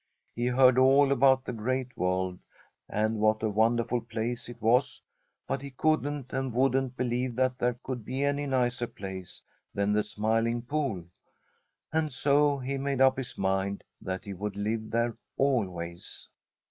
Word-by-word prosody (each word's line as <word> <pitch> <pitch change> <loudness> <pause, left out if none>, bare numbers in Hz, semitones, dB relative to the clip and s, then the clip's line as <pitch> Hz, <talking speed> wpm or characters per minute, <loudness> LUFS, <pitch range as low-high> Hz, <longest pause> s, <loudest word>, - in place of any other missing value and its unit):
He 120 +1 0
heard 130 0 +5
all 135 +2 +5
about 130 0 +4
the - - -4
Great 125 +3 -2
World 90 0 -1 0.5
and 110 +1 0
what 110 +1 +2
a 110 - +2
wonderful 115 +3 +2
place 115 +1 -4
it 120 -1 -10
was, 120 +4 +2 0.5
but 135 - -2
he 140 - -7
couldn't 145 -1 -1
and 135 -1 -1
wouldn't 130 +1 +1
believe 125 0 -1
that 130 0 +1
there 120 -1 +1
could 125 -3 -4
be 130 +5 -2
any 145 0 0
nicer 125 -2 0
place 95 -4 -8 0.3
than 100 +1 +1
the 105 - +3
Smiling 115 +3 0
Pool, 130 - -2 0.9
and 160 -1 +1
so 145 +2 +3
he 135 +1 -3
made 140 -1 -1
up 130 0 +6
his 130 -2 -6
mind 95 +1 -1 0.2
that 95 -1 -4
he 100 - -5
would 100 +2 -4
live 110 +2 -2
there 115 +1 +1 0.2
always. 90 -11 -2
120 Hz, 160 wpm, -29 LUFS, 110-135 Hz, 0.9 s, up